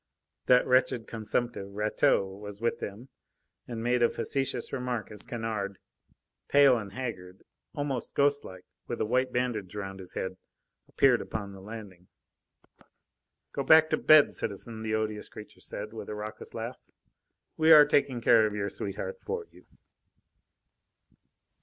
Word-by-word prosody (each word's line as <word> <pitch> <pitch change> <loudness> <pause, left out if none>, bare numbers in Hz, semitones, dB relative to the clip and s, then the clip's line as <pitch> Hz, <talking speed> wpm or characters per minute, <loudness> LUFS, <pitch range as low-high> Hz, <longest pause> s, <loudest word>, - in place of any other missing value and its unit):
That 125 0 +6
wretched 125 -2 +2
consumptive, 110 -2 -3
Rateau, 105 -2 +2
was 105 0 -9
with 115 +1 -1
them, 110 +6 -7 0.6
and 115 -2 -5
made 120 +1 +1
a 120 - +5
facetious 135 -3 -3
remark 125 -5 -3
as 105 -1 -9
Kennard, 110 -4 -4 0.7
pale 140 -2 +6
and 100 -3 -8
haggard, 95 -7 -6 0.3
almost 140 -4 -3
ghostlike, 140 -10 0 0.2
with - - -4
a - - +1
white 130 +3 +1
bandage 115 -7 -2
round 95 -1 -5
his 90 -1 -10
head, 95 0 -4 0.5
appeared 130 -3 +3
upon 100 -3 -5
the 95 -1 -11
landing. 100 -4 -10 1.4
"Go - - -3
back 155 +3 +6
to - - +3
bed, 155 -2 +6
citizen," 110 +2 -5
the 110 0 -1
odious 110 -1 -3
creature 105 - -12
said, 105 +2 -7
with 110 -2 -7
a 105 - -4
raucous 105 +1 -8
laugh. 115 +2 -5 0.8
"We 160 0 +4
are 150 -2 +10
taking 140 -4 +1
care 110 -1 +5
of 105 - -5
your 100 -1 -2
sweetheart 285 - -5
for 460 -1 -3
you." - - -19
115 Hz, 145 wpm, -29 LUFS, 105-125 Hz, 1.4 s, are